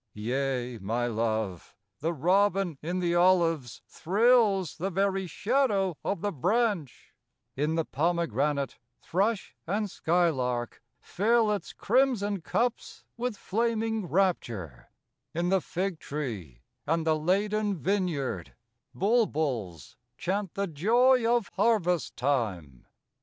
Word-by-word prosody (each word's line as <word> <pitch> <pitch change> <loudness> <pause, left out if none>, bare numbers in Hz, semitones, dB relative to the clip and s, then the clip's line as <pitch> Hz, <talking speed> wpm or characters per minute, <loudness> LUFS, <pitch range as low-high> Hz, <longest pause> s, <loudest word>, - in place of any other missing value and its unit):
Yea, 125 +1 -2
my 115 +5 -1
Love, 110 -5 -2 0.2
the 160 +3 -1
robin 185 +2 +2
in 175 +4 -3
the 175 -2 0
olives 170 -7 +2
Thrills 205 -2 +2
the 185 +4 -2
very 195 0 0
shadow' 200 - +1
of 195 -4 -2
the 205 - -1
branch; 185 - -1 0.4
In 150 +4 0
the 165 -1 0
pomegranate, 145 -3 0 0.2
thrush 200 +4 -1
and 205 +2 -1
skylark 130 -9 0 0.2
Fill 220 +3 +2
its 205 - -3
crimson 215 -5 +1
cups 240 +8 -2
with 240 -2 -3
flaming 225 -1 -1
rapture; 120 - -1 0.5
In 175 +1 0
the 190 0 +3
fig 180 -1 -3
tree 100 - -6 0.2
and 165 +1 +1
the 160 -1 +3
laden 200 +5 0
vineyard, 160 - -2 0.4
Bulbuls 145 - 0 0.2
chant 195 +1 -2
the 200 - 0
joy 230 - +3
of 240 -4 +1
harvest 195 -5 +1
time. 105 - -2
175 Hz, 110 wpm, -28 LUFS, 140-205 Hz, 0.5 s, the